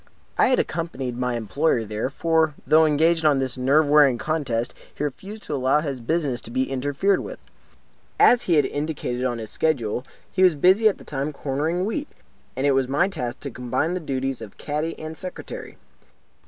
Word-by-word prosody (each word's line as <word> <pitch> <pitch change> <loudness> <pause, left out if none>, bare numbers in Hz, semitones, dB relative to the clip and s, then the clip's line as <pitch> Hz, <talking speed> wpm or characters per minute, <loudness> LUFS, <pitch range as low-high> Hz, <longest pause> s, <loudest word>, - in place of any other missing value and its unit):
I - - +4
had 255 - +3
accompanied 140 -7 -3
my 125 0 -1
employer 120 +3 0
there; 110 +3 -3
for, 160 +1 +1
though 160 +1 +5
engaged 160 +2 +2
on 150 -3 +4
this 130 -2 -1
nerve 140 +4 +3
wearing 145 -4 +5
contest, 125 -3 -2 0.2
he - - -4
refused 195 +10 -6
to - - -5
allow 135 +2 +2
his 140 -4 -4
business 135 -1 -1
to - - -10
be 130 +3 -1
interfered 145 +9 +1
with. - - -7 0.8
As 245 0 +6
he 170 - +1
had 145 - +4
indicated 145 -5 -3
in 125 -2 -1
his 110 -2 -4
schedule, 125 -7 0 0.3
he 185 - -1
was 180 -4 +6
busy 190 +9 +5
at 200 - -4
the - - -14
time 145 +1 -3
cornering 150 +6 -2
wheat; 285 +8 -3 0.5
and 130 +2 -1
it 145 - +4
was 135 -1 +2
my 150 +8 +2
task 125 -10 -5
to 140 - -5
combine 130 +8 -1
the 185 - -2
duties 135 -5 -3
of 105 -3 -10
caddy 150 +2 -3
and 155 0 -7
secretary. 185 - -8
145 Hz, 190 wpm, -23 LUFS, 130-160 Hz, 0.8 s, As